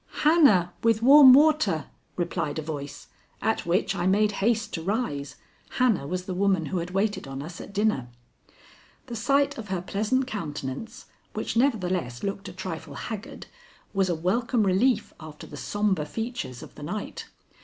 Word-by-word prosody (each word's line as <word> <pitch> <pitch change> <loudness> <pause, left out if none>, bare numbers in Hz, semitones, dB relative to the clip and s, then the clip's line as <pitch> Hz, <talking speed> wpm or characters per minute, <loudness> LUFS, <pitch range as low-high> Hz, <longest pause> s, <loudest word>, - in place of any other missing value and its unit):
"Hannah 225 - +5
with 225 -1 +2
warm 275 +1 +9
water," 290 - +4 0.3
replied 170 -4 -2
a 155 - -3
voice, 145 -2 -7 0.3
at 220 -5 -1
which 180 +5 +1
I 175 - 0
made 210 +2 +3
haste 220 0 +1
to 165 - -3
rise. 180 - -2 0.4
Hannah 235 - +2
was 180 +3 -3
the 185 - -4
woman 190 -3 +1
who 180 +4 -2
had 170 +1 -4
waited 195 -2 -1
on 135 +1 -6
us 170 +3 -8
at - - -10
dinner. 200 - 0 1.0
The 240 - -7
sight 275 +4 +1
of 215 - -7
her 190 -2 -2
pleasant 215 +8 0
countenance, 170 - -6 0.3
which - - -3
nevertheless 185 - 0
looked 200 0 -4
a - - -8
trifle 170 -6 -7
haggard, 215 +6 -7 0.5
was 195 -2 +1
a 175 - +1
welcome 225 +8 +1
relief 205 +4 +2
after 155 -1 -10
the - - -10
sombre 195 0 -1
features 225 - -5
of - - -12
the - - -13
night. 205 +9 -5
195 Hz, 165 wpm, -26 LUFS, 165-225 Hz, 1.0 s, warm